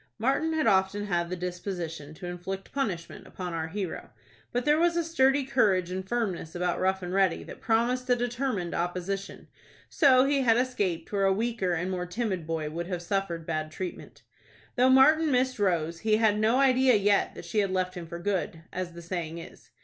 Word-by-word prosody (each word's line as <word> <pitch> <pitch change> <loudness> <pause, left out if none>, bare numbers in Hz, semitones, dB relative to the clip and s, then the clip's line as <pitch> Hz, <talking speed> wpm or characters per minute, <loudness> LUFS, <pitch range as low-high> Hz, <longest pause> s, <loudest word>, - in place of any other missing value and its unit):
Martin 275 +8 +1
had 315 -1 +1
often 190 +2 +2
had 175 -3 -1
the 185 - -2
disposition 175 -4 -5
to 180 - -9
inflict 180 +2 -6
punishment 200 -12 -4
upon 180 -2 -6
our 160 -1 -2
hero, 185 0 -5 0.4
but 245 0 -1
there 300 +1 +4
was 340 0 +2
a 340 - +2
sturdy 280 -4 +2
courage 200 -9 +2
and 190 +1 -5
firmness 195 -9 -2
about 175 0 -1
Rough 190 0 0
and 180 +1 -4
Ready 190 -3 +2
that - - -11
promised 245 +3 +1
a 245 - +5
determined 240 -7 -2
opposition. 180 +3 -3 0.4
So 265 -5 +5
he 275 0 +2
had 230 -3 +4
escaped 205 -10 -1
where 200 -1 +1
a 195 - +4
weaker 215 -3 0
and 175 +3 -2
more 180 -1 -3
timid 190 -4 -3
boy 160 -2 -2
would 170 +2 -4
have 180 -2 -4
suffered 175 -3 -2
bad 155 -1 -2
treatment. 180 +2 -7 0.5
Though 255 +1 +4
Martin 305 +5 +6
missed 255 -2 +1
Rose 170 -4 0
he 215 +2 +2
had 215 -2 +3
no 220 +3 +3
idea 260 -2 +4
yet 200 0 +2
that - - -9
she 215 - -1
had 200 -2 +1
left 185 -1 -1
him 175 -3 -7
for 170 - -6
good, 175 -3 -2
as 185 -2 -4
the 170 0 -10
saying 170 -2 -4
is. 165 - -12
195 Hz, 195 wpm, -28 LUFS, 175-245 Hz, 0.5 s, Martin